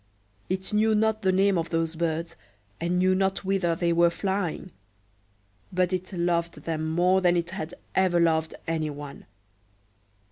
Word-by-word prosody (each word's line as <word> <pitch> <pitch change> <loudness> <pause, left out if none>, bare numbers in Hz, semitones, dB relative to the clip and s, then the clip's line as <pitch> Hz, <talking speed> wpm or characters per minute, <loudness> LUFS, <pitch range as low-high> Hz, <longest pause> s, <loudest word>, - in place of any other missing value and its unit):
It 190 +2 -3
knew 215 +1 +3
not 220 0 +1
the 190 -2 +2
name 190 -1 +3
of 165 0 -3
those 165 0 -1
birds, 165 0 -2 0.4
and 175 +2 0
knew 185 +1 +3
not 190 +1 0
whither 190 -3 +1
they 170 0 +1
were 170 0 +5
flying; 190 -1 -3 1.0
but 180 0 +1
it 185 +1 -3
loved 170 -2 -1
them 160 -1 -2
more 180 +3 +3
than 175 -1 +3
it 170 0 -2
had 165 -3 -5 0.2
ever 185 -2 +3
loved 160 -1 +1
any 160 -2 -1
one. 145 -1 -9
175 Hz, 155 wpm, -26 LUFS, 165-190 Hz, 1.0 s, were